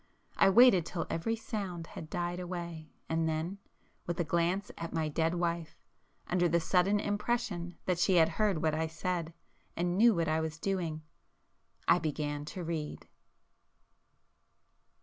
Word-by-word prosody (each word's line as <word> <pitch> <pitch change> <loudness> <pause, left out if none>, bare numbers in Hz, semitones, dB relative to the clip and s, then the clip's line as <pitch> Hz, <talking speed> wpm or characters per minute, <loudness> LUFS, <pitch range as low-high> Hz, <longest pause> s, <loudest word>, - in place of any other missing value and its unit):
I - - +5
waited 205 -3 +7
till 170 +1 -3
every 225 +8 0
sound 195 -7 -5
had 160 -1 -9
died 175 +1 -2
away, 170 -3 -6 0.2
and 160 0 +1
then—with 170 +1 -6
a - - +3
glance 170 +5 0
at 165 - -5
my 160 -1 +1
dead 160 +3 +1
wife, 170 -2 -2 0.5
under 175 -1 +2
the 170 +1 +3
sudden 185 +5 +2
impression 205 -5 -2
that 180 -2 0
she 185 +1 +3
had 165 -2 +6
heard 190 -2 0
what 155 -1 +2
I 160 +1 0
said, 165 +1 -3 0.5
and 175 +2 0
knew 230 -1 +6
what 165 -1 +1
I 155 +1 +1
was 160 0 -3
doing, 170 -4 -2 0.8
I 170 - +6
began 145 -2 -2
to 180 +3 -6
read. 160 -3 -4
170 Hz, 150 wpm, -32 LUFS, 160-185 Hz, 0.8 s, waited